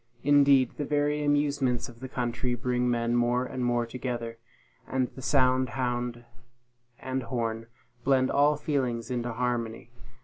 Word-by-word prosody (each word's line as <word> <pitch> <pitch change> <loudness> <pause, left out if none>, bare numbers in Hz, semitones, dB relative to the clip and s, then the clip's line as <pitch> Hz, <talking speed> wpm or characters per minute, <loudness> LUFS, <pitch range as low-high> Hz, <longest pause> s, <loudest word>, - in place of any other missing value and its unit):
Indeed, 140 -3 +4
the 150 - -1
very 145 +1 0
amusements 145 -4 +1
of 120 -2 -14
the 130 0 -7
country 125 0 -2
bring, 125 +1 0
men 120 0 +1
more 120 +1 +2
and 125 0 -4
more 120 -1 +1
together; 120 -1 -5 0.5
and 130 -1 0
the 130 - -9
sound 130 -1 +3
hound 120 -1 -2 0.7
and 130 0 -3
horn 115 -2 -3 0.4
blend 130 0 +3
all 145 +1 +4
feelings 130 -6 -2
into 120 -1 -2
harmony. 120 -1 -2
125 Hz, 140 wpm, -28 LUFS, 120-135 Hz, 0.7 s, Indeed